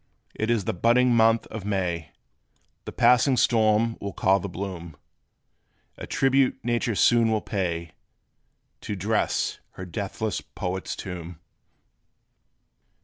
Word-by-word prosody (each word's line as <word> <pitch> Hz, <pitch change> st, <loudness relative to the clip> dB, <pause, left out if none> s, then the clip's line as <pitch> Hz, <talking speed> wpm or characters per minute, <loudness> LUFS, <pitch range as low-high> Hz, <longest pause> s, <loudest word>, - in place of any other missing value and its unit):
It 110 Hz, -, -3 dB
is 115 Hz, -5 st, +1 dB
the -, -, -1 dB
budding 120 Hz, +6 st, +3 dB
month 115 Hz, 0 st, +4 dB
of 110 Hz, -3 st, -6 dB
May: 90 Hz, -6 st, -2 dB, 0.8 s
This -, -, -8 dB
passing 125 Hz, +1 st, +4 dB
storm 115 Hz, -1 st, +2 dB
will 100 Hz, -1 st, -5 dB
call 95 Hz, +1 st, +2 dB
the 100 Hz, -, -5 dB
bloom 85 Hz, -4 st, -7 dB, 1.0 s
A -, -, -8 dB
tribute 135 Hz, -1 st, +2 dB
nature 120 Hz, -2 st, 0 dB
soon 115 Hz, +2 st, +4 dB
will 110 Hz, -1 st, +1 dB
pay, 85 Hz, -6 st, -3 dB, 0.9 s
To 105 Hz, -, -4 dB
dress 105 Hz, +3 st, -1 dB
her 90 Hz, -, -8 dB
deathless 100 Hz, +3 st, -4 dB
Poet's 95 Hz, +1 st, -5 dB
tomb. 90 Hz, -3 st, -7 dB
105 Hz, 120 wpm, -25 LUFS, 90-115 Hz, 1.0 s, month